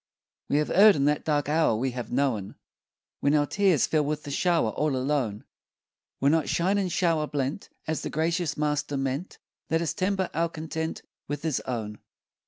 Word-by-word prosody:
We 145 - +2
have 150 - 0
erred 205 +1 +7
in 140 - +1
that 150 0 +1
dark 145 -2 0
hour 155 -5 +3
We 130 +4 -1
have 120 -2 -6
known, 120 -7 0 0.6
When 145 +1 +2
our 145 -1 +3
tears 185 -3 +3
fell 155 -2 +1
with 150 +1 -2
the 145 - -6
shower, 165 -6 +2
All 150 +1 0
alone! 130 -6 -1 0.8
Were 140 +2 +3
not 160 0 +1
shine 190 +4 +2
and 185 -3 -1
shower 165 -4 +1
blent 145 +5 -3 0.2
As 160 0 -2
the - - -4
gracious 165 0 -1
Master 150 -1 -1
meant? 135 +6 -3 0.3
Let 165 - +2
us 165 -2 -1
temper 190 -1 -1
our 170 +1 +1
content 160 0 -4 0.2
With 145 +1 -4
His 160 -4 0
own. 110 -4 -4
150 Hz, 185 wpm, -27 LUFS, 135-165 Hz, 0.8 s, erred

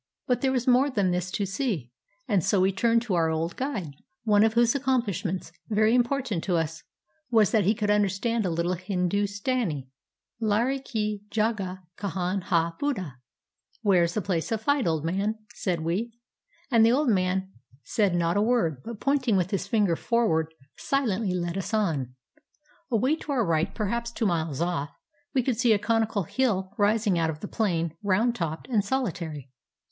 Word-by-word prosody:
But 250 - 0
there 265 - +2
was 250 -2 0
more 255 +3 +4
than 200 -8 +1
this 180 +1 -1
to 200 +2 -1
see, 195 - -2 0.4
and 190 -5 +2
so 200 - +2
we 190 +1 +3
turned 230 +4 +2
to 225 -6 -2
our 165 -2 +2
old 160 +2 -2
guide, 220 - -3 0.3
one 210 -2 +4
of 220 0 +2
whose 235 0 +4
accomplishments, 225 - -1 0.2
very 215 +1 +3
important 245 -6 +1
to 180 - +1
us, 160 -1 -1 0.5
was 220 -4 +4
that 215 -5 +3
he 210 +4 +3
could 205 0 0
understand 210 +3 +1
a 185 - 0
little 170 +2 0
Hindustani. 195 - -1 0.2
" - - -44
Larai 235 +6 +1
ki 215 -5 -2
jagah 210 -4 -1 0.2
kahan 190 -1 -2
hai, 170 -1 +2
buddha? 190 - -2 0.2
" - - -64
" - - -36
Where 195 -4 +4
is 170 0 0
the 215 - -1
place 175 -2 -1
of 220 -1 -1
fight, 285 -2 +2
old 160 -2 0
man? 200 +6 -1
" - - -18
said 175 -4 0
we. 185 +9 -1 0.6
And 230 -2 +6
the 225 - +6
old 285 0 +2
man 190 -1 +1 0.3
said 205 -6 +1
not 170 0 +1
a - - +3
word, 210 - +1
but 230 -2 -7
pointing 270 -7 +2
with 180 0 0
his 195 -2 -1
finger 200 -5 +2
forward, 165 -8 +1 0.3
silently 220 -8 0
led 175 +1 -2
us 195 +4 -2
on. 150 - -1 0.7
Away 255 +6 +2
to 300 - -6
our 240 -5 +2
right, 160 -1 +1
perhaps 235 +2 -1
two 235 -1 -2
miles 160 -6 -1
off, 170 -5 -1 0.5
we 260 - +3
could 240 -3 -1
see 240 -3 +5
a - - +3
conical 220 -1 0
hill 195 -2 0
rising 205 -3 +2
out 165 -1 +1
of 155 -1 -5
the 205 - -5
plain, 170 -8 -1
round 210 +4 +2
topped 165 -5 -4
and 225 -6 +2
solitary. 170 - -3
205 Hz, 185 wpm, -26 LUFS, 175-235 Hz, 0.7 s, And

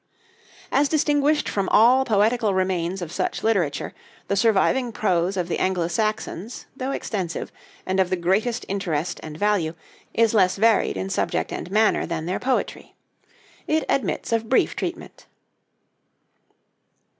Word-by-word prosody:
As 280 +1 +3
distinguished 295 -1 +2
from 195 -2 -1
all 250 +4 +5
poetical 220 -1 +2
remains 185 -1 -1
of 165 - -7
such - - -2
literature, 180 -10 0 0.4
the 200 - +1
surviving 230 +4 +2
prose 185 -3 0
of 180 -2 -1
the 175 - -2
Anglo 180 -3 0
Saxons, 215 +2 -3
though 260 0 -4
extensive, 190 -10 -3 0.3
and 190 +1 -1
of 185 -1 +2
the 185 - +1
greatest 195 +7 0
interest 180 -5 -2
and 155 -1 -8
value, 190 -5 0 0.4
is 230 -1 +2
less 185 -4 +3
varied 220 +1 +2
in 195 - -4
subject - - -1
and - - -5
manner 215 +2 +2
than 165 -1 -3
their 180 +2 -2
poetry. 260 0 -2 0.7
It 315 0 +1
admits 270 - -1
of 225 -1 0
brief 260 - +2
treatment. - - -6
200 Hz, 140 wpm, -23 LUFS, 180-230 Hz, 0.7 s, all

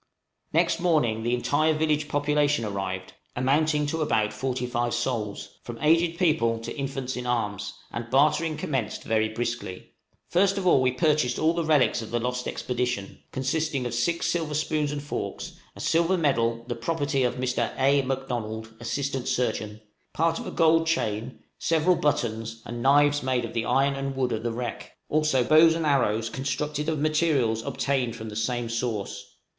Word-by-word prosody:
Next 170 +1 +2
morning 150 -11 +2
the 120 +2 +1
entire 155 +5 +2
village 155 -1 +1
population 145 -3 +1
arrived, 95 -2 -4 0.2
amounting 150 +4 +2
to 160 +2 -2
about 110 -8 +1
forty 125 +2 -2
five 120 -1 -1
souls, 120 -4 -3
from 120 -1 -8
aged 165 +2 +3
people 155 -11 +2
to - - -6
infants 135 -2 -3
in 125 0 -4
arms, 105 -5 -1 0.2
and 120 0 -5
bartering 155 +4 +3
commenced 130 -7 -2
very 110 -1 +1
briskly. 115 -4 -4 0.4
First 195 +2 +2
of 195 - -2
all 170 -7 +5
we 130 0 +3
purchased 140 -2 +1
all 160 +1 +2
the 170 0 -1
relics 150 -6 +3
of 110 - -7
the 120 - 0
lost 125 +1 -2
expedition, 120 -5 -3
consisting 135 0 -1
of 120 - -3
six 170 +8 0
silver 160 -3 -1
spoons 155 -1 0
and 145 -1 -4
forks, 145 - -5 0.2
a - - -12
silver 170 +3 +2
medal, 115 -7 +1
the 120 - -2
property 140 +2 -1
of 125 -1 +1
Mr. 125 -2 -1
A. 140 +1 +4
M'Donald, 120 -4 -4
assistant 135 +2 -2
surgeon, 110 -4 -1 0.3
part 165 +1 +1
of - - -6
a - - -4
gold 165 0 +3
chain, 115 -6 -2 0.2
several 165 +2 +3
buttons, 115 -6 -1
and 120 +1 -5
knives 145 +2 +4
made 130 -2 0
of 115 - -8
the 115 -1 -1
iron 135 +3 +2
and 135 0 -3
wood 130 -2 0
of 110 - -1
the 120 0 -2
wreck, 120 0 -5 0.2
also 155 -4 +2
bows 160 +4 +6
and 165 -1 -1
arrows 115 -6 +2
constructed 150 +4 -2
of 160 - 0
materials 145 -7 +1
obtained 125 -1 -1
from 110 -1 -7
the 105 - -8
same 120 +2 -1
source. 110 -4 -4
130 Hz, 170 wpm, -26 LUFS, 115-155 Hz, 0.4 s, bows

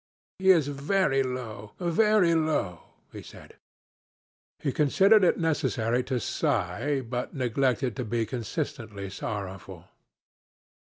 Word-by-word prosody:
'He 190 0 +2
is 165 -7 +5
very 145 0 +1
low, 120 -5 -5
very 185 +1 +3
low,' 155 - 0 0.3
he - - -9
said. - - -14 1.0
He 140 - -2
considered 195 +10 +4
it 180 - +4
necessary 125 -7 0
to 130 -1 -1
sigh, 125 +8 -1
but 125 0 -5
neglected 130 -1 0
to 125 - -2
be 115 0 -1
consistently 110 - -5
sorrowful. 95 -3 -6
130 Hz, 110 wpm, -27 LUFS, 110-155 Hz, 1.0 s, is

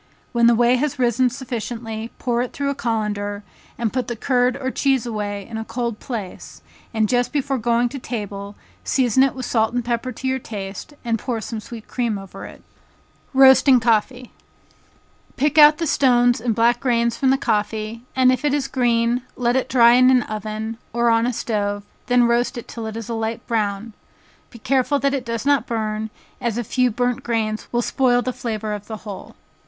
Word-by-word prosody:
When 235 -1 +4
the 235 - +5
whey 240 +2 +4
has 285 +1 -1
risen 250 0 +2
sufficiently, 230 -2 -5
pour 240 -2 0
it 250 - -4
through 280 0 -1
a - - -1
colander, 210 -4 -2 0.3
and 230 -3 -2
put 255 -2 -1
the 240 - -3
curd 250 +2 +1
or 260 -1 -3
cheese 270 -4 +1
away 205 -3 -4
in 225 - -6
a 220 - -3
cold 235 -1 -4
place, 215 -8 -7 0.3
and 220 -2 +1
just 245 +2 +1
before 275 -2 -1
going 235 +1 +2
to 275 +2 -6
table, 205 -4 -6 0.3
season 260 -2 +2
it 270 0 +3
with 260 -1 -5
salt 225 0 +1
and 245 -1 -1
pepper 240 +1 -2
to 265 - -5
your 260 0 0
taste, 205 +4 -7
and 230 -1 0
pour 240 -1 -3
some 220 0 -5
sweet 220 +1 -10
cream 235 -4 -1
over 195 0 -9
it. - - -14 0.7
Roasting 265 -1 +6
Coffee. 240 +2 0 1.1
Pick 295 +2 +2
out 300 0 +8
the 335 - -2
stones 245 -5 +3
and 230 -2 0
black 235 +2 +3
grains 235 -2 +1
from 265 +2 +1
the 270 - +4
coffee, 220 -1 -2
and 255 -1 +5
if 255 +1 -1
it 290 -1 +2
is 275 -2 -1
green, 240 -1 +1
let 240 0 +1
it 260 - 0
dry 235 -2 +6
in 255 +1 +6
an 255 -2 +4
oven, 215 +1 -5
or 235 0 +2
on 230 +1 +3
a - - +1
stove, 205 -3 -2 0.2
then 245 0 +4
roast 240 +2 +1
it 240 - -7
till 230 -2 -6
it 220 0 -6
is 230 -2 -6
a 235 - -3
light 225 +1 -3
brown, 215 -1 -2 0.6
be 235 - -13
careful 260 +4 +1
that 275 0 0
it 270 -3 -1
does 230 +1 -3
not 280 -5 +2
burn, 220 -1 -2 0.3
as 235 -3 -1
a 240 - -1
few 250 +3 +1
burnt 245 +2 -1
grains 220 -2 -2
will 240 0 +1
spoil 245 -1 +2
the 255 - -2
flavor 215 -3 -4
of 205 -1 -7
the 220 - -5
whole. 200 -3 -8
235 Hz, 200 wpm, -21 LUFS, 220-255 Hz, 1.1 s, out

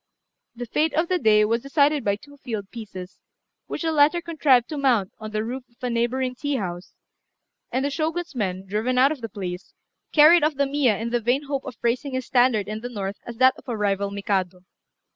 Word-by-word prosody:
The 245 +1 -5
fate 300 +5 0
of 320 +2 +1
the 365 -1 +1
day 210 -4 +4
was 230 +2 0
decided 285 +1 +2
by 200 -1 +1
two 285 +7 -16
field 220 -7 -6
pieces, 195 -5 -9 0.5
which - - -4
the 325 - +1
latter 305 +3 +4
contrived 290 -8 +2
to 305 - -4
mount 240 -9 +2
on 215 -1 -6
the 215 0 -2
roof 250 +3 -5
of 235 - -32
a 250 - -1
neighbouring 250 +2 0
tea 285 +3 -2
house; 180 -5 -5 0.8
and 260 +3 0
the 285 - -1
Shogun's 325 +3 -2
men, 190 -6 -3
driven 220 +6 -1
out 265 +3 +5
of 300 -5 -5
the 225 - -5
place, 180 -2 -7 0.4
carried 310 +2 +7
off 305 0 +2
the 280 +1 +2
Miya 275 -6 +2
in 230 +3 -4
the 240 0 +1
vain 245 +5 +1
hope 275 -1 -3
of 250 -5 -8
raising 255 +4 0
his 260 -1 -2
standard 245 -5 +2
in 215 +1 -4
the 245 - -5
north 200 -3 -4
as 235 -1 -7
that 260 +1 +6
of - - -19
a 235 - -2
rival 200 -1 0
Mikado. 195 -2 -2
245 Hz, 220 wpm, -24 LUFS, 210-280 Hz, 0.8 s, carried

